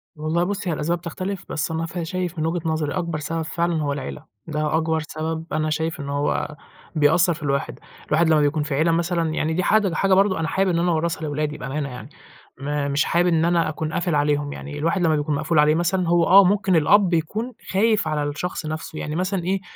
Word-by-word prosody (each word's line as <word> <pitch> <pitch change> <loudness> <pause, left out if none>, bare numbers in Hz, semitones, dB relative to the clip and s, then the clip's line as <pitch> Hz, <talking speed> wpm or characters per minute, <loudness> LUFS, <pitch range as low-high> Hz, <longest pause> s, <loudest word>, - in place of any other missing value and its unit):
والله 155 +3 0
بُصّي، 195 -1 -2
هي - - +1
الأسباب 165 +3 -1
تختلف، 185 +3 -5
بس 155 +1 -2
أنا 165 +1 -2
ف 175 +2 -6
شايف 180 0 -3
من 155 - 0
وجهة 165 -1 -1
نظري 155 -2 -1
أكبر 170 -3 -2
سبب 165 +2 -3
فعلًا 165 0 -1
هو 145 -1 -1
العيلة. 145 +2 -6 0.2
ده 155 0 -1
أكبر 160 0 0
سبب 160 +1 -4
أنا 155 0 0
شايف 160 +1 -2
إن 140 0 -5
هو 145 +1 -1 0.4
بيأثّر 170 +4 +4
في 155 -1 -10
الواحد. 140 -1 -2 0.3
الواحد 160 +2 +3
لمّا 155 -1 +4
بيكون 150 +1 +1
في 145 -2 -2
عيلة 160 +4 +2
مثلًا 170 -1 0
يعني 160 +1 -1
دي 185 - 0
حاجة 205 -3 +3
حاجة 195 +1 +2
برضو 195 0 +4
أنا 165 0 -1
حابب 195 0 +1
إن 170 -1 +1
أنا 175 0 +2
أورّثها 165 0 -1
لولادي 150 0 -2
بأمانة 140 +2 -4
يعني. 125 -1 -9 0.5
م 145 0 -1
مش 140 - +2
حابب 175 +1 +2
إن 165 -1 +3
أنا 170 -2 +2
أكون 155 0 -4
قافل 175 -2 0
عليهم، 145 0 +1
يعني 145 - -7
الواحد 165 +5 0
لمّا 160 -3 +3
بيكون 150 0 -1
مقفول 155 +1 +1
عليه 150 +1 +5
مثلًا 175 +1 0
هو 170 0 +4
آه 195 +2 +8
ممكن 190 -1 +2
الأب 180 +4 +4
يكون 215 +10 -1 0.2
خايف 210 -2 +2
على 150 -1 0
الشخص 155 +4 -4
نَفسه. 155 0 -5
يعني 150 - -4
مثلًا 185 +1 -1
إيه، 190 +1 -1
160 Hz, 220 wpm, -23 LUFS, 150-175 Hz, 0.5 s, آه